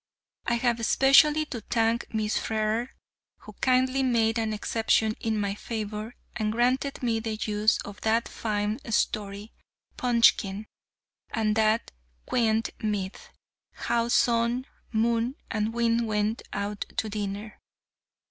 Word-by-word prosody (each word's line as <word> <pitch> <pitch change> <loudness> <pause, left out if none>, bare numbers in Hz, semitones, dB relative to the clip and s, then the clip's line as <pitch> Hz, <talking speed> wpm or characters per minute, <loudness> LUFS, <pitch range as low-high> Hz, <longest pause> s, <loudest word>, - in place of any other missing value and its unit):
I 235 - +2
have 235 -1 +1
especially 275 +6 +5
to 240 -6 -6
thank 230 +1 0
Miss 215 -1 -1
Frere, 220 +3 -1 0.5
who - - -12
kindly 255 +1 +3
made 230 -3 +2
an 220 -1 -1
exception 220 0 +1
in 220 -1 -1
my 200 -1 -1
favour, 215 +1 -5 0.2
and 215 -1 -1
granted 255 +4 0
me 230 -2 +1
the 220 -1 -3
use 215 0 +1
of 205 0 -10
that 225 +1 +1
fine 210 +1 -2
story, 205 0 -1 0.4
"Punchkin," 230 -4 +3 0.6
and 215 -2 0
that 220 +1 +2 0.3
quaint 225 -2 +1
myth, 205 -3 -3 0.4
"How 235 0 0
Sun, 235 +1 +2 0.3
Moon, 230 +3 +1 0.2
and 215 0 0
Wind 230 0 +1
went 215 +1 0
out 200 0 -4 0.2
to 220 - 0
Dinner." 205 0 -5
225 Hz, 125 wpm, -27 LUFS, 215-235 Hz, 0.6 s, especially